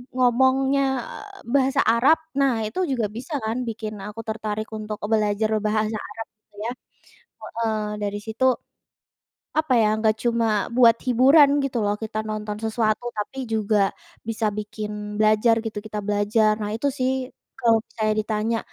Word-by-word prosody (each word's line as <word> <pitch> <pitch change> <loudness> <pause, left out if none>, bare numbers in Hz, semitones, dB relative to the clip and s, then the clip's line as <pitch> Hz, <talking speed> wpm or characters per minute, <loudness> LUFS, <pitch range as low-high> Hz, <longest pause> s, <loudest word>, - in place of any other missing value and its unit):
ngomongnya, 265 +2 +3 0.2
eee, 410 -1 -10
bahasa 270 0 +3
Arab, 255 +8 +5 0.2
nah, 245 -5 +2
itu 215 +12 -4
juga 235 -5 0
bisa, 245 +9 -7
kan, 235 +3 -2
bikin 215 -2 -5
aku 210 +2 -7
tertarik 215 -1 -4
untuk 215 -1 -5
e - - -1
belajar 215 0 +2 0.2
bahasa 215 0 0
Arab, 225 +2 -7
gitu 215 - -49
ya. 240 - -1 0.7
Heeh, 225 -1 -2 0.3
dari 205 0 -2
situ 225 +4 -2 1.1
apa, 315 -4 +1
ya, 215 -1 +4
nggak 220 0 +2
cuma 235 -1 +2 0.3
buat 235 -2 +6
hiburan, 270 +4 +6
gitu 255 -3 -1
loh, 205 - +1
kita 215 0 -4
nonton 215 -1 -4
sesuatu. 220 +1 0
Tapi 255 +5 -4
juga 215 -1 +1 0.5
bisa 225 -1 -1
bikin 210 0 -5 0.3
belajar, 215 +2 +4
gitu, 220 -2 -5
kita 210 -1 -4
belajar. 210 +1 +2
Nah, 210 -1 -3
itu 280 +5 0
sih, 255 0 +1 0.5
kalau 230 -2 +4
misalnya 215 -1 -1
ditanya, 220 +1 -1
220 Hz, 150 wpm, -23 LUFS, 215-245 Hz, 1.1 s, buat